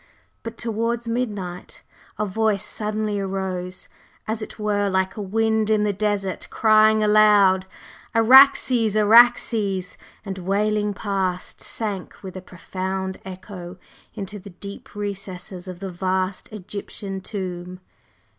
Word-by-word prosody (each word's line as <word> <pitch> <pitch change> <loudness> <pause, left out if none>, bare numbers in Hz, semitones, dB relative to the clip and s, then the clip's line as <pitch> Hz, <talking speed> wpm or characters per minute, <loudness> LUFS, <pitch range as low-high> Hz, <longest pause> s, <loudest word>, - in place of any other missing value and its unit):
But 230 0 -7
towards 230 +1 -2
midnight 205 -7 -4 0.3
a 210 - 0
Voice 210 0 0
suddenly 210 -1 -2
arose 190 -2 -4 0.4
as 220 +1 -2
it - - -8
were 205 -2 0
like 190 0 0
a 215 - -5
wind 220 +2 +1
in 215 -1 +3
the 210 -1 +1
desert, 200 -2 -2
crying 215 0 +4
aloud: 205 -3 +5 0.5
"Araxes! 240 -2 +6
Araxes!" 210 -3 +4 0.3
and 190 -1 -5
wailing 205 +2 0
past, 190 -3 -2
sank 205 -5 -4
with 190 -1 -8
a 185 - -6
profound 190 +1 -5
echo 185 -1 -9 0.4
into 205 +1 -6
the 200 - -11
deep 200 +3 -10
recesses 190 -2 -5
of 185 0 -8
the 195 -1 -4
vast 185 +1 -2
Egyptian 200 -1 -6
tomb. 180 -2 -5
200 Hz, 120 wpm, -23 LUFS, 190-215 Hz, 0.5 s, Araxes